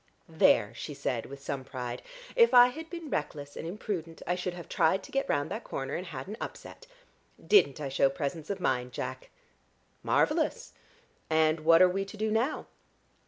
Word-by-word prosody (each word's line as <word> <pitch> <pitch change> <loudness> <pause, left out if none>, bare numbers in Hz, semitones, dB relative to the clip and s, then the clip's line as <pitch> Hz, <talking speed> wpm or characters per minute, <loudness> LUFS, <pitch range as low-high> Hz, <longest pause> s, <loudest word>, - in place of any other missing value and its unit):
"There!" 115 -9 +4
she 145 +5 -7
said 125 -5 -2
with 140 0 -10
some 135 -2 -3
pride. 125 -2 -5 0.3
"If 470 - +5
I 245 0 +9
had 320 +5 -8
been 335 -4 -7
reckless 145 -1 -3
and - - -6
imprudent 170 -4 -5
I - - +1
should 180 0 -3
have 175 -2 -9
tried 190 +4 +2
to - - -12
get 275 0 -1
round 145 - 0
that - - -4
corner 135 - -4
and 180 - -4
had 135 -6 -7
an 210 +3 -6
upset. - - -8 0.6
Didn't 415 - +5
I 145 -2 -3
show 135 0 +3
presence 150 +3 -4
of 200 -1 -2
mind, 125 -7 -1
Jack?" - - -5 0.7
"Marvellous. - - +1 0.6
And 160 0 +3
what 165 +3 +6
are - - +7
we 195 +2 -1
to 205 +2 -11
do 215 0 -1
now?" 235 +7 0
165 Hz, 185 wpm, -29 LUFS, 140-210 Hz, 0.7 s, I